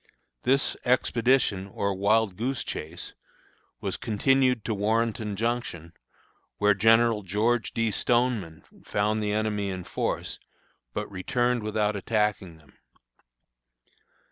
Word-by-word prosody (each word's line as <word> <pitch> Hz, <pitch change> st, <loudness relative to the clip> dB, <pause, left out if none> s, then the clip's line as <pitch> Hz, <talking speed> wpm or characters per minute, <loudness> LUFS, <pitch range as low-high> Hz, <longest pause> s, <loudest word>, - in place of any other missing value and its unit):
This 135 Hz, +2 st, +2 dB
expedition, 125 Hz, -5 st, +2 dB
or 100 Hz, 0 st, -2 dB
wild 100 Hz, +1 st, +2 dB
goose 125 Hz, +6 st, -2 dB
chase, 80 Hz, +3 st, -6 dB, 0.7 s
was -, -, -2 dB
continued 125 Hz, +1 st, +2 dB
to 110 Hz, -, 0 dB
Warrenton 110 Hz, 0 st, 0 dB
Junction, 105 Hz, -7 st, -3 dB, 0.6 s
where 105 Hz, 0 st, +4 dB
General 115 Hz, +2 st, +4 dB
George 105 Hz, +5 st, 0 dB
D. 115 Hz, -1 st, 0 dB
Stoneman 115 Hz, -9 st, 0 dB, 0.2 s
found 105 Hz, +1 st, 0 dB
the 105 Hz, -1 st, -1 dB
enemy 105 Hz, -1 st, -1 dB
in 95 Hz, -1 st, -4 dB
force, -, -, -3 dB, 0.6 s
but -, -, -1 dB
returned 120 Hz, +6 st, 0 dB
without 105 Hz, 0 st, 0 dB
attacking 105 Hz, -4 st, -1 dB
them. 75 Hz, -4 st, -22 dB
105 Hz, 110 wpm, -27 LUFS, 100-120 Hz, 0.7 s, where